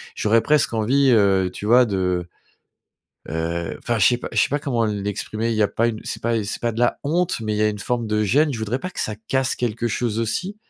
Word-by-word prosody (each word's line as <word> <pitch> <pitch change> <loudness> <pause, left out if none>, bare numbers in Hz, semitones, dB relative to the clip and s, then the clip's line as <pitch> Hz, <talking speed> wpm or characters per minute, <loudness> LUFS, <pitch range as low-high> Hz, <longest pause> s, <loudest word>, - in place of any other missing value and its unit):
j'aurais 110 +2 +2
presque 150 -6 +2
envie, 130 +5 +3
heu, 95 -4 +3
tu 105 - -6
vois 125 +2 +6
de, 90 -4 -1 1.0
heu, 85 +1 -3
enfin 120 -2 -1
je 95 - +5
sais 120 - +4
pas - - -6
je 115 - -3
sais - - +3
pas 145 +1 -1
comment 120 -6 0
l'exprimer, 105 +2 -3
il 110 - -1
y 110 - +3
a - - +4
pas 115 +1 +1
une 110 -2 -4
c'est - - -5
pas 115 -1 0
c'est 100 - -4
pas 120 - +1
de 115 - -7
la 120 - +2
honte, 165 +3 0
mais 110 -1 -2
il - - -2
y 105 - +1
a 105 - +4
une 105 -1 -4
forme 120 0 -2
de 105 0 0
gêne. 145 +8 +2
Je 115 - -4
voudrais 110 +4 -2
pas 185 +4 -6
que - - -5
ça 110 -1 -2
casse 130 0 0
quelque 120 0 -2
chose 115 0 -1
aussi 180 - -2
115 Hz, 260 wpm, -22 LUFS, 105-125 Hz, 1.0 s, vois